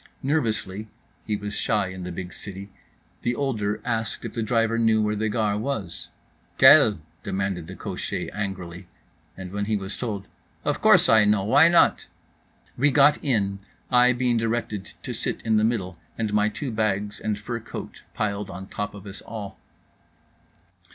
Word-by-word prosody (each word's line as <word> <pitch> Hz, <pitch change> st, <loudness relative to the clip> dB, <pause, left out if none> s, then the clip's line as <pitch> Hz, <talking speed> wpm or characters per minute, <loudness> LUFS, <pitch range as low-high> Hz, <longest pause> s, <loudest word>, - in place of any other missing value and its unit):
Nervously 110 Hz, -8 st, -1 dB, 0.4 s
(he 105 Hz, -, 0 dB
was 105 Hz, 0 st, -5 dB
shy 105 Hz, -3 st, 0 dB
in 95 Hz, -1 st, -7 dB
the 90 Hz, -, -5 dB
big 90 Hz, +1 st, -6 dB
city) 100 Hz, 0 st, -9 dB, 0.5 s
the 120 Hz, +1 st, 0 dB
older 110 Hz, -7 st, -1 dB
asked 115 Hz, -1 st, -2 dB
if 115 Hz, -, -5 dB
the 115 Hz, -, -2 dB
driver 115 Hz, +1 st, +1 dB
knew 110 Hz, -1 st, +4 dB
where 105 Hz, 0 st, +1 dB
the 110 Hz, +1 st, -1 dB
Gare 105 Hz, -2 st, 0 dB
was. 110 Hz, -9 st, -4 dB, 0.5 s
"Laquelle?" -, -, +7 dB, 0.2 s
demanded 95 Hz, -4 st, -2 dB
the 95 Hz, -, -8 dB
cocher -, -, -4 dB
angrily. 95 Hz, -3 st, -5 dB, 0.5 s
And 95 Hz, -1 st, -7 dB
when 100 Hz, +1 st, -2 dB
he 110 Hz, 0 st, 0 dB
was 95 Hz, 0 st, -5 dB
told—"Of 105 Hz, -5 st, -5 dB
course, -, -, +6 dB
I 110 Hz, -1 st, +6 dB
know, 105 Hz, -1 st, +3 dB
why 140 Hz, +10 st, +6 dB
not?" 170 Hz, 0 st, +4 dB, 0.7 s
We 145 Hz, +4 st, +3 dB
got 145 Hz, +1 st, +4 dB
in; 100 Hz, -8 st, 0 dB, 0.3 s
I 125 Hz, 0 st, +6 dB
being 120 Hz, -1 st, +1 dB
directed 115 Hz, -3 st, -2 dB
to -, -, -4 dB
sit -, -, -2 dB
in 110 Hz, -1 st, +2 dB
the 105 Hz, -, +3 dB
middle, 95 Hz, -7 st, -1 dB, 0.2 s
and 110 Hz, -2 st, -2 dB
my 105 Hz, 0 st, +3 dB
two 130 Hz, +4 st, -5 dB
bags 105 Hz, -1 st, -1 dB
and 105 Hz, -1 st, -2 dB
fur 115 Hz, +3 st, -4 dB
coat 115 Hz, -, -8 dB
piled 105 Hz, -1 st, -2 dB
on 95 Hz, +1 st, -8 dB
top 105 Hz, 0 st, -4 dB
of 100 Hz, 0 st, -11 dB
us 100 Hz, 0 st, -8 dB
all. 100 Hz, -4 st, -8 dB
105 Hz, 165 wpm, -25 LUFS, 100-115 Hz, 0.7 s, Laquelle